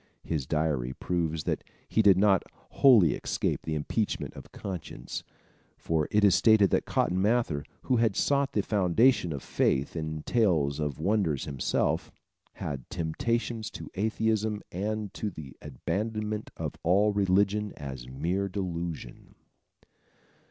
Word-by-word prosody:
His 75 -6 -2
diary 75 -5 0
proves 80 -1 -2
that - - -2 0.2
he 110 - +2
did 100 -3 +6
not 95 -1 +4 0.3
wholly 115 - +6
escape - - -1
the 80 - -3
impeachment 100 +8 -2
of - - -12
conscience, 95 -5 -6 0.5
for 80 -2 0
it 105 0 +2
is 100 -3 +6
stated 110 +1 +5
that - - +1
Cotton 90 +1 +1
Mather, 105 -9 +1 0.2
who 125 - +2
had 115 -4 +2
sought 140 -1 +1
the 105 - +1
foundation 100 0 +3
of 70 -3 -5
faith 70 +4 0
in 80 -1 -4
tales 80 - +2
of 75 -3 -2
wonders 85 -5 0
himself, 70 -3 -1 0.4
"had 70 -4 -6
temptations 110 +7 -2
to - - -9
atheism 110 0 0
and 105 +2 -3
to 105 - -3
the 75 -8 -10
abandonment 105 - -3
of - - -3
all 100 +5 +3
religion 100 +1 +2
as 65 -4 -7
a - - -11
mere 90 +9 -1
delusion." 85 -8 -5
95 Hz, 140 wpm, -28 LUFS, 80-105 Hz, 0.5 s, did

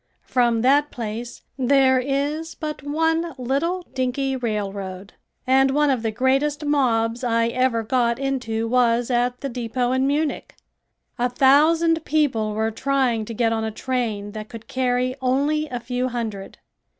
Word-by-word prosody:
From 240 -2 +1
that 285 +3 +4
place 230 +1 -6 0.2
there 260 0 +4
is 285 +5 -2
but 305 -2 -5
one 325 +3 0
little 285 +9 -1
dinky 265 +1 -1
railroad 200 -5 -4 0.3
and 265 +1 +4
one 295 +1 +2
of 255 -4 0
the 225 - -1
greatest 270 +6 0
mobs 240 -5 +1
I 230 -1 +1
ever 245 -2 +1
got 235 0 +1
into 250 -5 -2
was 240 0 +2
at 245 +1 0
the 275 - -3
depot 245 0 -2
in 260 +1 +1
Munich. 295 +2 -2 0.6
A 245 +1 +1
thousand 315 +6 +4
people 255 -10 0
were 220 +1 0
trying 255 -2 0
to 230 - -7
get 225 0 +1
on 220 0 -1
a 220 - -1
train 220 -3 -3
that 215 0 -8
could 225 -1 -10
carry 255 0 0
only 285 +4 +1
a 245 - -4
few 250 +1 -2
hundred. 225 -5 -5
255 Hz, 150 wpm, -22 LUFS, 230-275 Hz, 0.6 s, that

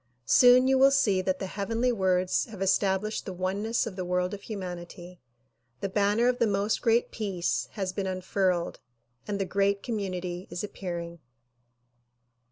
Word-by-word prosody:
Soon 250 - +6
you 265 0 +3
will 270 +1 +7
see 210 -9 +2
that 185 0 -1
the 190 - -4
heavenly 225 +6 -1
words 185 -4 +1
have 215 -4 -11
established 195 +2 0
the 190 - -4
oneness 200 +7 -1
of 220 -5 -6
the 185 - -3
world 180 +1 -1
of 200 - -6
hu 220 - -5
manity. 175 -1 -8 0.6
The 195 - -2
banner 205 +4 +2
of 250 0 +1
the 235 - +3
"Most 200 +1 0
Great 230 +1 +2
Peace" 195 -6 -2
has 190 -3 -3
been 195 0 -2
unfurled 185 -1 -1 0.5
and 205 -1 -2
the 195 - -1
"great 200 +1 0
community" 185 -5 -4
is 175 - -5
appearing. 170 -4 -6
195 Hz, 165 wpm, -28 LUFS, 185-215 Hz, 0.6 s, will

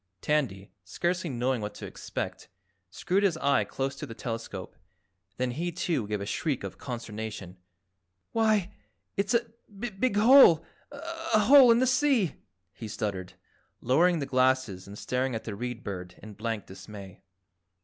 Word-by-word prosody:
Tandy, 110 -10 -1
scarcely 175 - -2
knowing 125 -1 -1
what 105 0 -5
to - - -7
expect, - - -6 0.4
screwed 185 - 0
his 190 -5 +2
eye 140 -3 +2
close 135 0 -3
to - - -6
the 115 - -8
telescope, 115 -4 -6 0.6
then 125 0 0
he, 170 +7 -2
too, 165 - -1
gave 105 -1 -2
a 100 - -4
shriek 140 +5 -2
of - - -7
consternation. 110 -6 -6 0.7
"Why 215 -4 +2 0.4
it's 200 +4 +1
a 235 0 +2 0.2
big 210 +2 -2
HOLE, 215 - +7 0.3
a 325 -5 -1
HOLE 265 +3 +8
in 230 - +7
the 255 - +3
sea!" 255 - +2 0.4
he 110 - -8
stuttered, 100 -4 -4 0.5
lowering 170 +8 +3
the 145 - -2
glasses 130 -8 +1
and 100 +1 -9
staring 125 +1 -1
at 110 - -4
the 110 - -5
Read 120 +2 -5
Bird 90 -2 -6
in 110 0 -9
blank 110 0 -4
dismay. 95 0 -11
130 Hz, 150 wpm, -28 LUFS, -, 0.7 s, HOLE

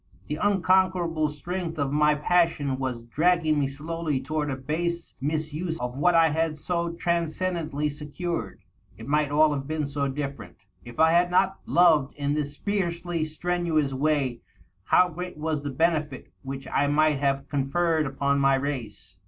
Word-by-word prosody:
The 150 - -4
unconquerable 185 -4 +2
strength 165 +3 -5
of 140 -2 -1
my 150 +1 +3
passion 150 -4 +1
was 125 -3 -3
dragging 155 +4 +2
me 140 - +1
slowly 155 +1 -3
toward 150 +1 -2
a 135 - -1
base 170 +5 -3
misuse 155 +3 -2
of 125 0 -4
what 175 +5 +3
I 165 -1 +6
had 160 0 -1
so 170 +2 -2
transcen 170 +2 -1 0.2
dently 150 +1 -1
secured. 150 - -5 0.3
It 115 +3 -10
might 150 0 +2
all 150 +1 +4
have 135 -1 -4
been 155 -1 -1
so 140 0 -2
different! 140 -4 -5 0.3
If 120 -1 -11
I 160 0 +6
had 175 +1 +4
not 190 +2 +2
loved 160 -6 +4
in 145 0 -1
this 145 -1 -3
fiercely 175 -5 -2
strenuous 155 -3 -1
way, 135 -3 0 0.4
how 180 - +5
great 180 0 -7
was 155 -1 -2
the 145 - -4
benefit 150 -1 -1
which 135 0 -7
I 145 - +1
might 150 0 +3
have 140 0 0
conferred 155 +3 0
upon 140 +1 0
my 135 0 +4
race 135 -4 -5
150 Hz, 160 wpm, -26 LUFS, 140-170 Hz, 0.4 s, I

